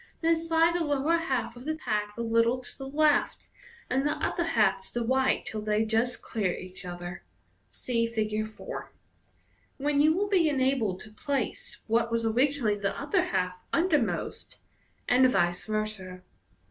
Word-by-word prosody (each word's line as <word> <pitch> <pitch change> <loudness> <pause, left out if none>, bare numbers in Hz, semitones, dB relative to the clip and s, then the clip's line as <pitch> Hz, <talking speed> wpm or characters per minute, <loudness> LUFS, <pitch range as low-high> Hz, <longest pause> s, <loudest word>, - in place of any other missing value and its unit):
Then 330 0 +4
slide 330 +1 +2
the 345 -1 0
lower 295 +2 +2
half 265 -7 -2
of 245 - -10
the 315 +1 -1
pack 210 -7 -2
a 235 - -2
little 230 +2 +3
to 255 - -10
the 270 - -7
left, 300 +1 +2 0.4
and 265 +2 +1
the 295 - +1
upper 345 - -2
half 220 - +2
to - - -19
the 240 -1 0
right 260 +2 +2
till 215 - -4
they 210 +1 +1
ji 225 +2 +2
st 245 - -8
clear 200 -6 -1
each 185 +1 -10
other 175 0 -6 0.5
(see 230 -2 -1
Fig. 215 -1 -2
4), - - -8 0.8
when 285 0 +2
you 315 +3 +4
will 410 +1 +1
be 360 -6 +3
enabled 260 -9 +1
to 215 - -11
place 275 0 -3
what 230 +1 +1
was 230 0 0
originally 250 0 +2
the 200 -1 -2
upper 355 +6 +1
half 180 - -2
undermost, 325 -8 0 0.5
and 255 +1 +5
vice 175 -5 +1
versa. 215 -4 -3
240 Hz, 170 wpm, -28 LUFS, 215-290 Hz, 0.8 s, and